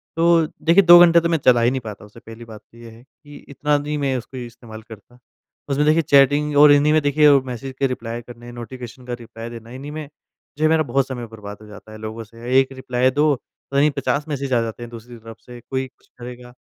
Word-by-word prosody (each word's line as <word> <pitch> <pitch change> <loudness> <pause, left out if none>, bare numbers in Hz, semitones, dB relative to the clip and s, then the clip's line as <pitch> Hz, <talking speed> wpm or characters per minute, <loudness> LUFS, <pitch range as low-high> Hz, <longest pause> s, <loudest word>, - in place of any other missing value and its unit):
तो 165 0 +3 0.2
देखिए 170 +5 +4
2 175 -1 +9
घंटे 170 -1 +7
तो 170 - -1
मैं 165 - +2
चला 120 -2 +5
ही 120 +1 +3
नहीं 130 - -2
पाता 105 -2 -9
उसे 105 +3 -16
पहली 115 +1 -12
बात 110 -2 -12
तो 115 - -19
ये 115 0 -12
है 115 +2 -17
कि 145 +2 -17
इतना 145 +1 0
नहीं 150 +1 -4
मैं 140 -2 -1
उसको 125 +2 -9
इस्तेमाल 120 -2 -10
करता। 115 +2 -15 0.5
उसमें 140 +2 +1
देखिए 155 +2 +3
चैटिंग 145 0 +3
और 145 0 +8
इन्हीं 145 +1 +4
में 155 - +3
देखिए 145 +1 +4
मैसेज 130 +1 -7
का 140 - +2
रिप्लाई 120 -2 -5
करने, 120 0 -12
नोटिफिकेशन 120 +1 -10
का 125 - -5
रिप्लाई 115 0 -9
देना, 115 -1 -11
इन्हीं 135 +3 -8
में 155 -1 -7 0.5
जो 155 - -3
है 155 - +4
मेरा 160 0 +3
बहुत 135 0 0
समय 125 -3 -6
बर्बाद 105 -2 -10
हो 105 - -14
जाता 105 +1 -13
है 110 - -10
लोगों 110 +1 -7
से। 115 +4 -1
एक 135 0 0
रिप्लाई 130 -1 0
दो, 150 +2 +2
पता 140 +2 -9
नहीं 150 +2 +3
50 145 +1 -2
मैसेज 140 -3 -3
आ 120 - +3
जाते 115 +1 -6
हैं 120 - -9
दूसरी 120 +1 -11
तरफ 115 0 -12
से, 120 +1 -13
कोई 130 0 -2
कुछ 130 - -31
करेगा। 125 0 -10
125 Hz, 240 wpm, -20 LUFS, 115-145 Hz, 0.5 s, 2